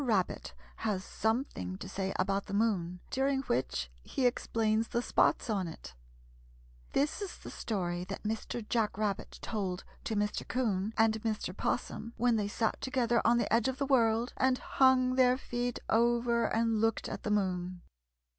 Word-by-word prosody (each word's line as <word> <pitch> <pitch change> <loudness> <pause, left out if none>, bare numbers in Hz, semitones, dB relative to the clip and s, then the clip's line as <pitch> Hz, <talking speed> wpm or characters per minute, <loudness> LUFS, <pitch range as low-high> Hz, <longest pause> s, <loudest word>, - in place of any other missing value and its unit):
RABBIT 210 -8 0 0.2
HAS 205 -4 -1
SOMETHING 220 - -1
TO - - -7
SAY 190 0 -2
ABOUT 195 +1 0
THE 200 - -3
MOON, 180 -5 0
DURING 270 0 +1
WHICH 65 - -1
HE 255 - -2
EXPLAINS 225 -2 +1
THE 235 - 0
SPOTS - - +2
ON 200 -5 0
IT 115 - -9 1.0
This 295 +8 +1
is 395 -3 -5
the - - -9
story 175 -5 -2
that 195 +1 -6
Mr. 220 +1 -3
Jack 220 -4 0
Rabbit 210 -2 -2
told 195 -4 -2 0.2
to 220 - -1
Mr. 210 0 -1
'Coon 215 -5 0
and 220 -1 +3
Mr. 215 -5 -2
'Possum 230 +2 -2
when 240 -1 +3
they 210 -2 0
sat 220 +2 -1
together 245 -3 +1
on 235 +2 +4
the 235 -2 0
edge 230 +1 +4
of 260 0 -1
the 280 - 0
world 235 -3 +3
and 260 0 +3
hung 255 -1 +3
their 255 -1 +5
feet 245 -2 -2
over 235 0 +3
and 225 -1 +1
looked 225 0 +1
at - - -5
the - - -3
moon. 185 -3 0
225 Hz, 165 wpm, -32 LUFS, 195-240 Hz, 1.0 s, their